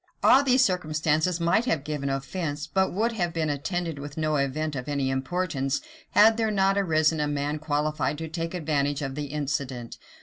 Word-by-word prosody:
[] -, -, -31 dB
All 270 Hz, -, +7 dB
these 260 Hz, -1 st, +4 dB
circumstances 160 Hz, -1 st, 0 dB
might 170 Hz, +8 st, +2 dB
have 160 Hz, -, 0 dB
given 145 Hz, -2 st, -3 dB
offence, 145 Hz, +2 st, -3 dB
but 190 Hz, 0 st, +1 dB
would 225 Hz, +5 st, 0 dB
have 175 Hz, -7 st, -2 dB
been 160 Hz, -2 st, 0 dB
attended 165 Hz, +2 st, -3 dB
with 145 Hz, +1 st, -8 dB
no 155 Hz, -1 st, 0 dB
event 145 Hz, +2 st, -1 dB
of 125 Hz, +2 st, -5 dB
any 140 Hz, -2 st, 0 dB
importance, 135 Hz, 0 st, -1 dB, 0.4 s
had 220 Hz, +1 st, +7 dB
there 225 Hz, -1 st, +1 dB
not 195 Hz, -1 st, +2 dB
arisen 160 Hz, -5 st, +2 dB
a 150 Hz, -, +1 dB
man 145 Hz, +1 st, -2 dB
qualified 150 Hz, -1 st, -1 dB
to 160 Hz, +1 st, -5 dB
take 165 Hz, +2 st, -4 dB
advantage 145 Hz, -3 st, 0 dB
of 135 Hz, -1 st, -3 dB
the 145 Hz, +1 st, -4 dB
incident. 140 Hz, -4 st, -4 dB
155 Hz, 190 wpm, -26 LUFS, 145-175 Hz, 0.4 s, All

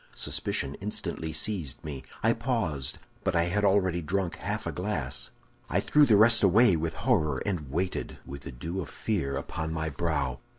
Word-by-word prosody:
Suspicion 70 Hz, 0 st, -1 dB
instantly 95 Hz, -5 st, -1 dB
seized 80 Hz, -3 st, -2 dB
me. 70 Hz, -3 st, -5 dB, 0.2 s
I 115 Hz, +1 st, +5 dB
paused, 110 Hz, -, -1 dB, 0.3 s
but 95 Hz, -2 st, 0 dB
I 85 Hz, -, +4 dB
had 95 Hz, +4 st, 0 dB
already 95 Hz, -3 st, +3 dB
drunk 90 Hz, +1 st, -1 dB
half -, -, -3 dB
a -, -, -1 dB
glass. 75 Hz, -9 st, -3 dB, 0.4 s
"I -, -, +2 dB
threw 150 Hz, -1 st, +4 dB
the 110 Hz, -4 st, +6 dB
rest 110 Hz, +2 st, +7 dB
away 100 Hz, +1 st, +6 dB
with 80 Hz, 0 st, -2 dB
horror, 75 Hz, -3 st, +3 dB
and 85 Hz, -9 st, -2 dB
waited, 90 Hz, +6 st, -2 dB
with 70 Hz, +1 st, -8 dB
the 65 Hz, -, -7 dB
dew 80 Hz, +10 st, -4 dB
of 75 Hz, -, -7 dB
fear 80 Hz, -11 st, -1 dB
upon 80 Hz, 0 st, -4 dB
my 80 Hz, 0 st, -2 dB
brow. 70 Hz, -5 st, -1 dB
85 Hz, 175 wpm, -28 LUFS, 75-100 Hz, 0.4 s, rest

